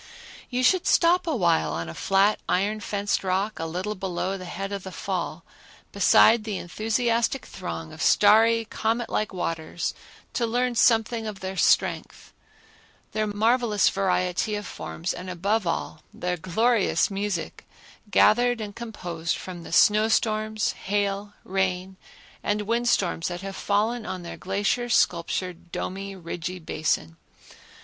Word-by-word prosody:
You 250 0 -1
should 365 +7 +3
stop 345 +1 +4
a 320 - +1
while 170 - +2
on 85 0 -3
a 80 - -6
flat 195 - +2
iron 205 +4 +1
fenced 205 -1 -1
rock 195 +3 -1
a 165 - -2
little 185 +6 -3
below 190 -1 -3
the 185 -1 -7
head 195 +3 -5
of 200 -1 -3
the 190 - -8
fall 175 -2 -4 0.5
beside 215 +3 +5
the 210 -3 -3
enthusiastic 230 +6 0
throng 80 -1 -6
of - - -9
starry 225 +2 +5
comet 225 +2 -2
like 215 - -1
waters 165 -2 -3 0.4
to 235 - 0
learn 245 +2 0
something 225 -1 +2
of 205 -2 -6
their 190 0 -5
strength, - - +1 0.8
their 215 0 -1
marvelous 220 0 +2
variety 185 +1 0
of 205 0 -5
forms, 170 0 -4
and 185 - -7
above 195 +3 0
all, 160 -2 -3
their 180 0 -2
glorious 205 +6 +1
music, 195 -3 -3 0.4
gathered 245 +4 +4
and 205 -2 -6
composed 175 -8 -4
from 180 -2 -8
the - - -10
snow 210 +5 +5
storms, 215 -1 +1
hail, 205 0 -2
rain 190 0 -1 0.5
and 210 0 -1
wind 235 +3 0
storms 170 -7 +1
that 175 0 -5
have 195 0 -6
fallen 215 +4 0
on 185 -1 -5
their 170 - -7
glacier 205 +6 -1
sculptured, 175 -4 0
domey, 195 +1 -4
ridgy 175 0 -5
basin. 155 - -2
200 Hz, 145 wpm, -25 LUFS, 180-220 Hz, 0.8 s, beside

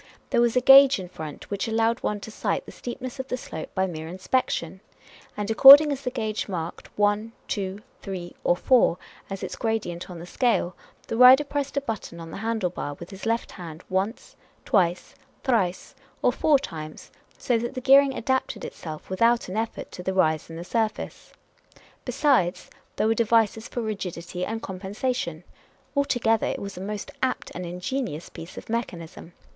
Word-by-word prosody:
There 235 - +3
was 240 0 +2
a 250 - +4
gauge 270 +1 +8
in 185 -2 -7
front 155 -2 -9
which 200 +3 -2
allowed 225 +1 +1
one 210 - -1
to 220 - -8
sight - - -2
the - - -10
steep 240 0 -7
ness 255 +1 -6
of 265 - -4
the 250 - -2
slope 160 -9 -7
by 190 - +2
mere 160 -3 -6
inspection; 185 -1 -2 0.6
and 210 +1 -2
according 280 +6 +10
as 275 -1 -3
the 255 - -2
gauge 220 -4 -3
marked 170 -3 -5
one, 205 +2 +1
two, 200 0 -3 0.2
three, 185 -3 -6
or 175 - +3
four, 235 -3 +3 0.3
as 195 -1 -5
its - - -4
gradient 215 -7 -3
on 180 - -8
the 170 - -8
scale, 185 -4 0 0.3
the 225 - -3
rider 255 +3 +9
pressed 285 -1 -3
a - - +2
button 220 -9 -5
on 165 -1 -8
the - - -6
handle 220 -3 -1
bar 145 -4 -5
with 170 +5 -11
his 195 +2 -7
left 230 +1 -1
hand 165 -3 -9
once, 195 +5 -2 0.3
twice, 180 -3 +1 0.3
thrice, 200 -9 0 0.3
or - - +5
four 300 -2 +3
times, 155 - -8 0.3
so 240 -2 +1
that 240 +4 -4
the - - -2
gear 270 +2 +7
ing 275 -2 -2
adapted 260 +3 -1
itself 155 -2 -8
without 230 +3 +2
an 185 - -5
effort 225 +1 -3
to - - -8
the 190 +1 -2
rise 160 -4 +2
in 165 - -8
the 170 - -6
surface. 220 +3 -3 0.7
Besides, 250 - +1 0.2
there - - +1
were 220 - +4
devices 225 -1 +2
for 240 - -4
rigidity 180 -4 -4
and 225 +1 -4
compensation. 190 -2 -3 0.5
Altogether, 245 -6 +2
it - - -2
was 200 -1 -6
a 180 - -7
most 205 +1 -5
apt 260 -1 -1
and 180 0 -5
ingenious 180 - -4
piece 165 - -10
of - - -8
mechan 220 -7 -3
ism. 165 +1 -12
215 Hz, 185 wpm, -25 LUFS, 180-245 Hz, 0.7 s, according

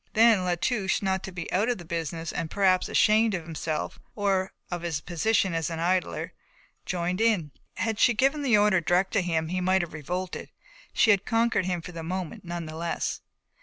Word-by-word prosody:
Then 220 -4 +5
La 180 -1 +1
Touche, 195 +1 0
not 190 -1 0
to 190 - -7
be 175 -2 -6
out 205 +6 +2
of 245 - 0
the 175 - -10
business 165 0 -4
and 160 - -3
perhaps 190 -1 +2
ashamed 215 0 +4
of 175 - -4
himself, 160 -1 -4 0.2
or 195 -2 0 0.2
of 175 -1 -3
his 165 -3 -2
position 185 +3 +1
as 165 -1 -1
an 165 - -4
idler, 180 +2 -1 0.5
joined 180 +2 -1
in. 205 -10 +2 0.2
Had 225 -1 -2
she 240 - +5
given 275 +6 +2
the 250 -6 +4
order 205 -3 +4
direct 180 +3 +1
to 200 - +3
him 160 -3 -1
he 185 +1 -1
might 185 0 +2
have 170 - -7
revolted; 180 +4 -4 0.4
she 220 - +4
had 200 -1 +3
conquered 225 -5 +1
him 175 -2 -2
for 180 - -8
the 165 -1 -7
moment 180 +1 -4
none 170 -1 -5
the 155 0 -8
less. 170 +1 -2
185 Hz, 205 wpm, -27 LUFS, 170-205 Hz, 0.5 s, Then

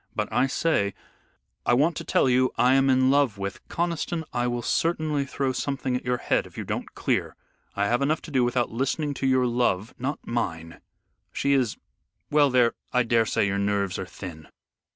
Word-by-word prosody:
But, - - -2
I 135 - +3
say, 130 - 0 0.7
I 120 - +3
want 155 +6 +2
to - - -4
tell - - +2
you 130 0 +3
I 125 +1 +4
am 135 0 +4
in 130 0 +4
love 140 -7 +2
with 100 -1 -5
" - - -37
"Conniston, 170 -1 -2
I 120 0 0
will 120 0 -2
certainly 155 -2 0
throw 135 -1 -1
something 135 -1 -2
at 125 - -3
your 125 0 0
head - - 0
if - - -17
you - - -3
don't - - -5
clear. - - -1 0.4
I 100 - +1
have 120 +5 +1
enough 150 +3 0
to 160 - -9
do 130 -3 +3
without 120 0 0
listening 140 +5 -1
to 135 - -2
your 130 -1 +3
love 120 -3 0
" - - -39
"Not 135 +4 -2
mine. 85 -9 -3 0.5
She 140 - +1
is 125 -6 +1 0.5
well 145 -1 +5
there, 125 -2 +3 0.2
I 125 0 +3
daresay 115 -3 +2
your 100 0 0
nerves 100 -2 0
are 95 - -5
thin. 80 -5 -9
125 Hz, 200 wpm, -25 LUFS, 115-140 Hz, 0.7 s, well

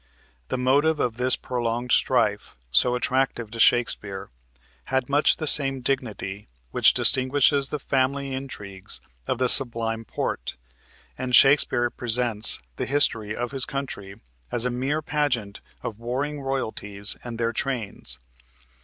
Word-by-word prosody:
The - - -2
motive 145 +5 +2
of 120 -2 -1
this 125 +1 +4
prolonged 120 0 -3
strife - - +1 0.2
so 125 - +4
attractive 125 -3 -1
to 115 - -7
Shakespeare 100 -5 +2 0.5
had 130 -1 -1
much 145 +2 +3
the 160 - -3
same 135 -3 +4
dignity 110 -6 -3 0.2
which - - +5
distinguishes 135 +1 +3
the 150 - -3
family 135 0 -1
intrigues 105 - -7 0.3
of 130 - -1
the 130 0 +1
Sublime 115 -3 +2
Porte, - - -4 0.6
and 125 -1 +1
Shakespeare 130 -3 +4
presents 115 -3 +1 0.2
the - - -3
history 115 -7 0
of 120 0 -4
his 135 -2 -1
country 115 -8 -6 0.4
as 120 0 +1
a 125 - 0
mere 135 +5 -2
pageant 140 -10 -2 0.2
of 110 -1 -6
warring 140 +5 -3
royalties 110 -6 -2
and 120 -1 -7
their 115 0 -1
trains. 110 - -2
125 Hz, 135 wpm, -24 LUFS, 115-135 Hz, 0.6 s, which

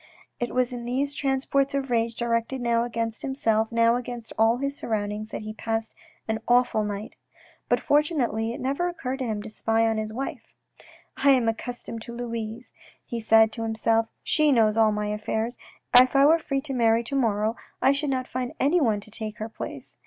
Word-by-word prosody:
" - - -31
It 240 - -2
was 250 0 +1
in 240 -1 -6
these 270 +4 -1
transports 275 0 0
of 270 -2 -2
rage, 230 -1 +1
directed 235 +2 -1
now 235 -1 +1
against 230 -2 -3
himself, 225 -5 0
now 230 +1 +4
against 240 -2 -7
all 225 +2 +3
his 275 +2 -2
surroundings, 215 -3 -3
that - - -6
he 215 0 -6
passed 225 0 -3 0.3
an 220 0 -1
awful 245 -3 +3
night; 205 0 -5 0.6
but, - - +3
fortunately, 265 -7 +1
it 235 - -6
never 280 +7 -1
occurred 270 -6 -4
to 260 - -2
him 210 -2 -3
to 220 - -7
spy 225 +1 +1
on 225 -1 0
his 215 0 -4
wife. 265 +5 -6 0.3
" - - -25
I 280 - +6
am 255 -4 +4
accustomed 230 0 -4
to 235 +1 -8
Louise," 230 0 -5 0.3
he 235 -2 -4
said 220 0 +5
to 230 - -6
himself, 225 0 +1
" - - -49
she 305 -2 +4
knows 220 -4 +4
all 220 -1 +4
my 210 0 -2
affairs. 220 +3 -2 0.4
If 255 +2 +8
I 275 0 +6
were 325 +3 +6
free 275 -3 -2
to 275 -1 -5
marry 230 -2 +3
to 260 +4 -4
morrow, 220 -3 +1 0.2
I 270 - +4
should 285 +1 -1
not 260 -1 -1
find 250 -1 -4
anyone 275 -8 +2
to 215 - -14
take 215 -1 -6
her 220 +1 -5
place." 135 - -8
230 Hz, 205 wpm, -26 LUFS, 220-260 Hz, 0.6 s, If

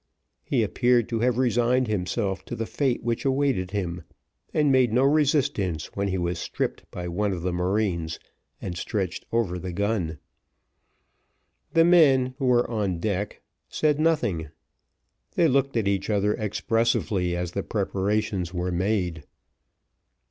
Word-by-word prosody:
He - - +1
appeared 120 -2 +2
to 115 -2 -1
have 120 0 +1
resigned 125 0 +2
himself 95 -1 -1
to - - -5
the 115 - -3
fate 130 0 -1
which 115 0 -1
awaited 135 -8 +1
him, 90 -4 -3 0.5
and 150 -3 +2
made 130 -3 +4
no 125 +4 +3
resistance 140 - +1
when 100 0 0
he 95 -1 -1
was 85 -1 -2
stripped - - -3
by 90 -1 -6
one 100 +4 -1
of 90 -3 -4
the 90 -1 -1
marines, 90 -3 -1 0.4
and 90 - -5
stretched 95 0 -3
over 100 -6 0
the 90 +1 -5
gun. 95 -4 -1 1.6
The 165 0 +5
men, 135 -7 +5
who 135 - -1
were 125 -1 +3
on 105 -6 -1
deck, 100 +2 -3 0.3
said 150 -1 +1
nothing; 150 - +1 0.9
they 170 - +4
looked 135 -2 +1
at 110 -3 +1
each 100 0 0
other 105 0 +2
expressively 105 -4 0
as 90 -1 -3
the 100 - -2
preparations 100 -2 -1
were 90 0 -2
made. 90 -3 -1
105 Hz, 145 wpm, -25 LUFS, 90-125 Hz, 1.6 s, The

